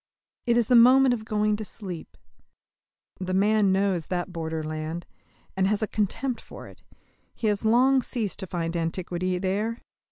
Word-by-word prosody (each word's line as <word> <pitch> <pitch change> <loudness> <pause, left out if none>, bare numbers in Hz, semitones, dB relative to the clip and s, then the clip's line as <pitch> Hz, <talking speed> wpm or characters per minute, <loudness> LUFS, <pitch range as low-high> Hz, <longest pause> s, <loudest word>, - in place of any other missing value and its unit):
It 235 0 +3
is 240 - +3
the - - +2
moment 255 +2 +7
of 220 -3 -4
going 210 0 +1
to 215 - -5
sleep. 190 -5 -7 1.0
The 185 0 -2
man 205 0 +3
knows 190 -4 +1
that 180 0 -3
borderland, 160 0 -4 0.5
and 190 0 +2
has 210 +2 0
a - - 0
contempt 225 +5 -2
for - - -11
it: - - -16 0.5
he 235 - -5
has 210 -1 +1
long 255 +4 +4
ceased 230 -5 -3
to 190 - -4
find 170 -1 -3
antiquity 175 +2 -2
there. 200 +5 -1
200 Hz, 160 wpm, -26 LUFS, 175-220 Hz, 1.0 s, moment